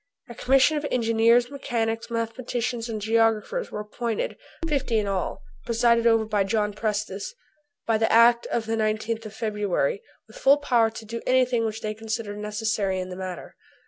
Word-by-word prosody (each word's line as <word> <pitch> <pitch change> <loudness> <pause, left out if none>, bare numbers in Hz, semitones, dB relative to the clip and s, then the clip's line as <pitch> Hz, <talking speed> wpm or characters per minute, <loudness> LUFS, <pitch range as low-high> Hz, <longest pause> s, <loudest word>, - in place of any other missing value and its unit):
A - - -7
commission 270 +5 +3
of 295 - -3
engineers, 230 +1 +3
mechanicians, 230 -5 -2
mathematicians, 235 0 -3
and 220 -1 -3
geographers 225 - +1
were 210 - -5
appointed 225 +1 -3 0.3
fifty 275 -7 0
in 210 - +1
all, 195 -2 -3 0.2
presided 235 0 +3
over 225 -1 +4
by 210 -2 +1
John 210 +1 0
Prestice 210 - -3 0.5
by 225 -1 +1
the 225 - +2
act 235 +1 +5
of 230 - -1
the 225 0 -1
19th 220 +1 -1
of 215 - -12
February, 210 -7 -1 0.3
with 220 - -14
full 275 +2 +5
power 240 -6 +2
to 225 0 -10
do 230 +2 -5
anything 255 -2 +3
which 220 0 -4
they 215 0 -3
considered 220 -1 -5
necessary 210 -2 -1
in 185 0 -4
the 180 - -6
matter. 185 -1 -7
225 Hz, 170 wpm, -25 LUFS, 210-235 Hz, 0.5 s, act